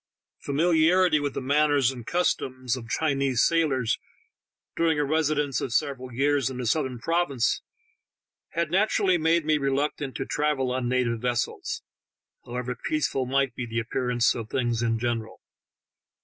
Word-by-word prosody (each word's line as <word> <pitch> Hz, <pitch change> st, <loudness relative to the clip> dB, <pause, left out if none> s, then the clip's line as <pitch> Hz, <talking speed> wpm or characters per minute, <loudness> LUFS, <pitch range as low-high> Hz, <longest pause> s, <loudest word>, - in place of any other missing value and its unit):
Familiarity 165 Hz, +2 st, +3 dB
with 145 Hz, -1 st, -3 dB
the -, -, -2 dB
manners 145 Hz, -1 st, +3 dB
and 120 Hz, -3 st, -10 dB
customs 130 Hz, -8 st, 0 dB
of 115 Hz, -3 st, -9 dB
Chinese 135 Hz, -4 st, +1 dB
sailors 140 Hz, -8 st, +1 dB, 0.8 s
during 165 Hz, -2 st, +2 dB
a 150 Hz, -, +1 dB
residence 150 Hz, -2 st, 0 dB
^of 130 Hz, -, -3 dB
several 130 Hz, 0 st, -1 dB
years 140 Hz, +1 st, +1 dB
in 130 Hz, -, -6 dB
the 125 Hz, -, -3 dB
southern 130 Hz, +1 st, 0 dB
provinces 140 Hz, -3 st, 0 dB, 0.9 s
had 170 Hz, -2 st, -1 dB
naturally 190 Hz, -1 st, +2 dB
made 165 Hz, 0 st, +2 dB
me 155 Hz, -1 st, +2 dB
reluctant 140 Hz, -1 st, -1 dB
to -, -, -3 dB
travel 145 Hz, -4 st, 0 dB
on 125 Hz, -1 st, -1 dB
native 120 Hz, -3 st, 0 dB
vessels, 120 Hz, -1 st, -2 dB, 0.6 s
however 125 Hz, +1 st, -4 dB
peaceful 140 Hz, -4 st, 0 dB
might 135 Hz, -1 st, +1 dB
be 125 Hz, -1 st, -5 dB
the 115 Hz, 0 st, -5 dB
appearance 120 Hz, +1 st, +1 dB
of 115 Hz, -2 st, -6 dB
things 120 Hz, -3 st, 0 dB
in 115 Hz, -1 st, +1 dB
gen 120 Hz, 0 st, 0 dB
eral. 110 Hz, -, -11 dB
135 Hz, 150 wpm, -26 LUFS, 125-155 Hz, 0.9 s, Familiarity